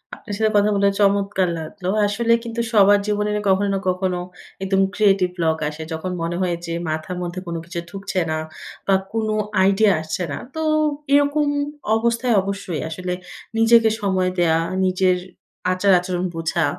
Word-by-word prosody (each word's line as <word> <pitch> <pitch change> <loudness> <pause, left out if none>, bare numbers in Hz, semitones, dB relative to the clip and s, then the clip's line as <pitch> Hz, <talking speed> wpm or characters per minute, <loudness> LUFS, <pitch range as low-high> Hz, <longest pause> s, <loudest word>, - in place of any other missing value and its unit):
আপনার 210 - -9
সাথে 220 -1 +2
কথা 205 +1 +4
বলে 200 0 +3
চমৎকার 200 -1 +2
লাগলো। 180 +4 -7 0.2
আসলে 230 +3 +1
কিন্তু 235 0 -3
সবার 205 -2 +6
জীবনে 210 0 0 0.2
কখনো 200 +1 +2
না - - -1
কখনো 185 0 -1 0.4
একদম 195 0 +2
creative 195 -4 +3
block 160 -2 +1
আসে। 155 +1 -7
যখন 160 +3 -4
মনে 170 +1 -2
হয় 180 -2 0
যে 165 - -4 0.2
মাথার 155 +4 -3
মধ্যে 175 +1 -4
কোন 170 - -3
কিছু 175 0 -5
ঢুকছে 195 -1 -3
না 155 - 0 0.5
বা, 195 - +4 0.2
কোনো 220 -1 0 0.3
আইডিয়া 200 +2 +4
আসছে 160 +4 -3
না। - - -3 0.2
তো 320 - -2 0.5
এরকম 285 +1 +3 0.5
অবস্থায় 235 +1 +1
অবশ্যই 190 -5 -4
আসলে 180 +3 -4 0.4
নিজেকে 225 0 +5
সময় 190 -2 +1
দেয়া, 165 -2 +3 0.3
নিজের 185 0 +2 0.6
আচার-আচরণ 185 -1 +2
বোঝা 165 0 0
195 Hz, 155 wpm, -21 LUFS, 180-210 Hz, 0.6 s, সবার